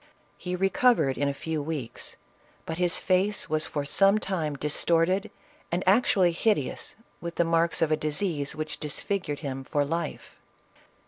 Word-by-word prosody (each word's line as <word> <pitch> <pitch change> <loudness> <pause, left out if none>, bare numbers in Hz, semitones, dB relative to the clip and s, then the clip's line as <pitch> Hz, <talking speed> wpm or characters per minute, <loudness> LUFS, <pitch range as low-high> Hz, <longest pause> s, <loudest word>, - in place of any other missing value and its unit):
He 180 0 -4
recovered 195 - +3
in 145 - 0
a - - +1
few 155 +2 -3
weeks, 145 -6 -4 0.5
but 160 +1 -4
his 175 -1 +3
face 190 +3 +1
was 155 0 +2
for 145 -2 -3
some 195 +7 +4
time 170 -8 -2
distorted 165 +7 +1 0.4
and 175 +2 0
actually 190 -3 +4
hideous 165 - 0 0.2
with 170 0 -6
the - - +3
marks 165 0 +2
of 160 - +1
a - - +5
disease 150 -1 -1
which 155 0 -5
dis 150 -2 -4
figured 180 -8 -3
him 135 -3 -4
for 145 +1 0
life. 165 +4 -4
165 Hz, 155 wpm, -27 LUFS, 150-185 Hz, 0.5 s, a